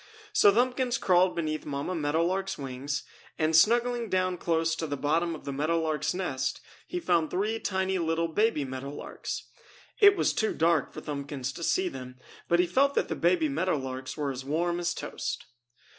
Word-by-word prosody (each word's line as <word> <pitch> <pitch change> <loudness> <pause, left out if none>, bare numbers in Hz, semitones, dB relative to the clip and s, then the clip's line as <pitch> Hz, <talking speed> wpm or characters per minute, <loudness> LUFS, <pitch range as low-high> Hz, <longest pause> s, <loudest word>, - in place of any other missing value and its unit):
So 205 - +6
Thumbkins 250 +3 +1
crawled 180 0 +3
beneath 155 -2 -2
Mamma 145 +5 -3
Meadow 160 0 +1
Lark's 190 +2 -1
wings 140 +1 -4 0.3
and, 155 +1 +2
snuggling 235 +5 +4
down 185 -1 +1
close 165 -1 0
to 160 - -2
the 145 -1 -3
bottom 165 +4 +1
of - - -12
the 140 - -3
meadow 155 +4 +1
lark's 155 0 -1
nest, 130 -8 -2 0.3
he 360 - -3
found 170 - +1
three 215 +4 -1
tiny 190 -2 -1
little 165 0 0
baby 165 -3 +1
meadow 130 +1 -5
larks. 145 - -6 0.5
It 405 -2 +7
was - - +2
too 220 - 0
dark 165 -1 +2
for - - -8
Thumbkins 140 -3 -4
to 170 - -9
see 185 +2 +1
them, 130 -4 -8 0.3
but 170 - +3
he 180 - +5
felt 275 +11 +2
that - - +1
the - - -1
baby 170 -2 +2
Meadow 165 +4 0
Larks 130 0 -5
were 145 -2 -1
as 130 0 -6
warm 170 +5 0
as 175 0 -1
toast. - - -4
165 Hz, 190 wpm, -28 LUFS, 145-185 Hz, 0.5 s, It